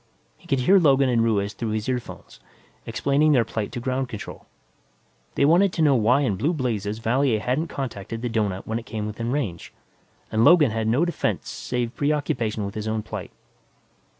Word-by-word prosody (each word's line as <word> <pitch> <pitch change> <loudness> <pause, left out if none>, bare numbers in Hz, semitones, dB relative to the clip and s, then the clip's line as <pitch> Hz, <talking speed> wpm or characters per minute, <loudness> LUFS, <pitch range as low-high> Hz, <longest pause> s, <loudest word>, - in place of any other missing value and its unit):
He 175 - -21
could 135 -5 +1
hear 190 +9 +5
Logan 140 -5 +4
and 115 -2 +2
Ruiz 105 -2 0
through 115 - -4
his 110 +1 -3
earphones, 125 -2 -5 0.5
explaining 145 +2 +2
their 120 -4 +3
plight 110 -1 -4
to - - -3
Ground 130 +1 -2
Control. 105 -4 -8 0.9
They 140 - +3
wanted 175 +6 +4
to 160 - +1
know 145 -2 +5
why 125 +3 +3
in 105 -9 0
blue 155 - 0
blazes 110 - -2
Valier 120 +1 +1
hadn't 130 +9 -1
contacted 115 -5 -6
the - - 0
doughnut 105 -4 -1
when 110 +1 -2
it 120 - -13
came 110 -3 -4
within 115 +3 -4
range, 115 - -3 0.6
and 110 +1 +2
Logan 150 -3 +6
had 110 0 -2
no 125 +9 +2
defense 175 - -2
save 120 -1 -3
preoccupation 125 -8 -1
with 100 - -5
his 110 +1 -5
own 110 0 -2
plight. - - -6
120 Hz, 185 wpm, -24 LUFS, 110-140 Hz, 0.9 s, Logan